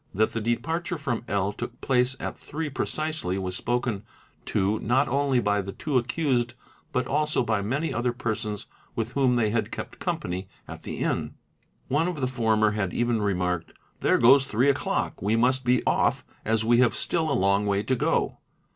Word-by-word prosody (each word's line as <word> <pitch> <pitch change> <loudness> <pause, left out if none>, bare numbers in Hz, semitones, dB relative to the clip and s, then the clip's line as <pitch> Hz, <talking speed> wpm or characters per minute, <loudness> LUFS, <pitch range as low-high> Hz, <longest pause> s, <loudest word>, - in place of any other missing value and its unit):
That 110 +2 +2
the 115 - -3
departure 165 +10 -1
from 125 -6 -2
L. 100 0 0
took - - -6
place 125 0 +2
at - - -4
three 155 0 -5
precisely 155 - -2
was 95 -1 -3
spoken 120 -2 -1 0.5
to 100 +3 +1
not 130 +5 +2
only 135 -1 +2
by 105 -2 +1
the 100 0 -6
two 145 -4 0
accused 120 -2 0 0.4
but 125 -2 0
also 150 +1 +1
by 110 -3 0
many 140 +11 -1
other 120 +1 0
persons 110 -3 -3 0.3
with 115 +1 -2
whom 130 -2 +2
they 110 -3 +2
had 115 0 0
kept - - -7
company 95 +2 -3 0.2
at - - -8
the - - -6
inn. - - -1 0.5
One 155 +6 +1
of 175 -4 -3
the 130 - +1
former 110 -4 +2
had 100 -4 -2
even 120 -2 +1
remarked 90 -4 -1 0.3
'There - - +3
goes 135 +3 +6
three 130 +2 +3
o'clock, 135 - -2
we 105 +4 +2
must 130 +3 +2
be 125 0 +2
off - - +2 0.2
as 110 0 +1
we 120 +1 +4
have 125 -2 +4
still 160 -3 0
a - - +2
long 100 +2 +2
way 100 0 +1
to 130 - +1
go." - - 0
120 Hz, 185 wpm, -26 LUFS, 105-135 Hz, 0.5 s, goes